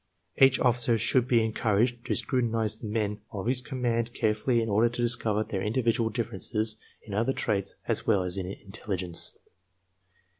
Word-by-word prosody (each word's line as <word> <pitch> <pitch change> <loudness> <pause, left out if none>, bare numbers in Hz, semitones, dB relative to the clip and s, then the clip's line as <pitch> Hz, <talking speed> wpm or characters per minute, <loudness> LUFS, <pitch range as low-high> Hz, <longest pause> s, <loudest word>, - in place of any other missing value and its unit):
Each 135 -1 +5
officer 120 -1 +2
should 120 +2 +2
be 115 -3 +3
encouraged 115 +2 0
to - - 0
scrutinize 115 -5 0
the 110 - -7
men 105 -1 -2
of 100 -1 -5
his 125 +1 +2
com 130 -1 -6
mand 115 0 0
carefully 110 +3 +1
in 115 - -1
order 110 +3 +3
to 120 +1 -4
discover 110 -3 +2
their 95 -3 -4
individual 115 +1 +1
differences 110 0 -2 0.3
in 105 - -9
other 115 +6 +1
traits 100 -6 -1
as - - 0
well 100 -4 +3
as 90 0 -1
in 95 -2 -3
intelligence. 95 -2 -3
115 Hz, 165 wpm, -28 LUFS, 105-120 Hz, 0.3 s, Each